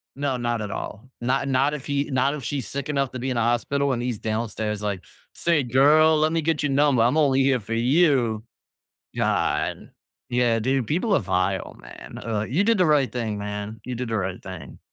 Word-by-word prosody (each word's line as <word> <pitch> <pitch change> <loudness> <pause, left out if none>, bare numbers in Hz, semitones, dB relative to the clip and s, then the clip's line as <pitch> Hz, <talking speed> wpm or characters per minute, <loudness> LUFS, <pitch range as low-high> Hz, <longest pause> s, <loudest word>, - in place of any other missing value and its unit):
No, 140 -2 -1
not 120 -2 -1
at 105 -1 -4
all, 110 +5 -6
not 135 +3 0
not 135 +2 +2
if 145 -3 -6
he 140 0 0
not 135 +2 +1
if 140 - -6
she's 130 -4 -3
sick 140 0 -4
enough 140 -3 0
to 130 - -5
be 130 +2 -3
in 125 - -2
a - - +2
hospital, 130 +4 +1
and 120 -1 -2
he's 120 -4 -2
downstairs 110 -1 -3
like, 100 -3 -2 0.3
"Say, 165 -4 +1
girl, 150 +5 +5
let 155 +1 +2
me 165 -1 0
get 160 -1 0
your 145 - 0
number, 135 -3 +3
I'm 125 +6 +2
only 135 -3 +3
here 130 -2 +2
for 115 - -8
you." 125 -4 +2 0.7
God. - - -1 0.4
Yeah, 120 -2 +2
dude, 130 0 0
people 185 - 0
are - - +3
vile, 95 0 -1
man, - - -11
ugh. 110 -2 -2
You 170 +11 +1
did 225 -1 +3
the 180 - +4
right 145 -4 +3
thing, 115 -4 -2
man. 105 +1 -5
You 125 - -4
did 120 0 -4
the 110 - -1
right 95 -2 -3
thing. 95 -3 -9
125 Hz, 215 wpm, -24 LUFS, 110-140 Hz, 0.7 s, girl